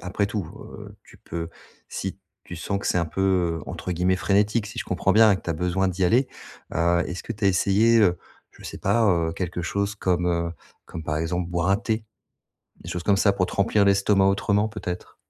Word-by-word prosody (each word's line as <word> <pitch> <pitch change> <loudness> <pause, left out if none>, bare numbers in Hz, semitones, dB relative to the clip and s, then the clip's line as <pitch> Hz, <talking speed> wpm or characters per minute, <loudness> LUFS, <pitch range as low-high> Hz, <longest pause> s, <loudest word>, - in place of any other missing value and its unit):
après 95 +2 -1
tout, 100 -2 -3 0.3
heu, - - -11
tu - - -17
peux 85 0 -6 0.4
si - - -5 0.3
tu 90 - -8
sens 100 +4 -2
que - - -6
c'est 90 - +2
un 85 - +1
peu, 90 -1 0
heu, - - -11
entre 90 - -5
guillemets 90 +2 +1
«frénétique», 105 +3 +1
si 115 +3 -9
je - - -2
comprends 95 +1 0
bien 110 0 +6
et - - +1
que - - -12
tu 85 - -4
as - - +2
besoin 90 +4 0
d'y 95 +1 -1
aller, 125 +8 +3 0.5
heu, 85 +1 +2
est-ce 90 0 -6
que 115 - -5
tu 105 -1 -5
as - - +6
essayé, 100 +5 +3
heu, 90 -4 +3 0.3
je - - -16
sais - - -7
pas, 115 -1 +2
heu, 85 -3 +1
quelque 90 -1 -4
chose 100 +4 -2
comme, 90 -2 0
heu, 85 -1 0 0.4
comme, 80 - -7
par 75 0 -2
exemple, 85 +2 -2
boire 85 +1 0
un 100 - +4
thé? 110 0 -2 0.8
Des - - -10
choses 90 - -4
comme 100 0 +3
ça 100 0 +3
pour 95 -2 0
te - - -8
remplir 100 +1 +2
l'estomac 100 0 +3
autrement, 100 +2 +1
peut-être? 90 -5 -6
95 Hz, 230 wpm, -24 LUFS, 90-100 Hz, 0.8 s, bien